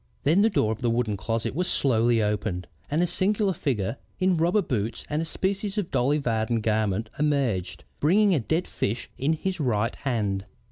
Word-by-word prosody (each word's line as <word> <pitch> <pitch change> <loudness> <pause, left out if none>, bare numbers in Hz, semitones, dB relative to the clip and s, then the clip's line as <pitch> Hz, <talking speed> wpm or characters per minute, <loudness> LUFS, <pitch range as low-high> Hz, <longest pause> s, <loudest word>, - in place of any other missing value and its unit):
Then 160 +8 +4
the 220 - +5
door 110 - +1
of 110 - -4
the 120 - +1
wood 115 -2 0
closet 115 +4 -2
was 180 +5 -1
slowly 115 -3 +2
opened 105 -3 -1 0.2
and 155 +4 +2
a - - +4
singular 195 +3 +1
figure 120 - -1 0.2
in 185 -1 +3
rubber 175 +5 +2
boots 115 -5 -2
and 150 +2 +1
a - - -2
species 195 +4 -2
of 200 -5 -2
Dolly 135 +3 +2
Varden 115 -4 0
garment 110 0 0
emerged, 120 - 0 0.2
bringing 195 +6 +4
a 160 - +3
dead 160 +9 0
fish 115 +4 -3
in 145 +5 +2
his 185 +3 -3
right 115 -4 +1
hand." 105 -7 -1
130 Hz, 185 wpm, -26 LUFS, 110-170 Hz, 0.2 s, the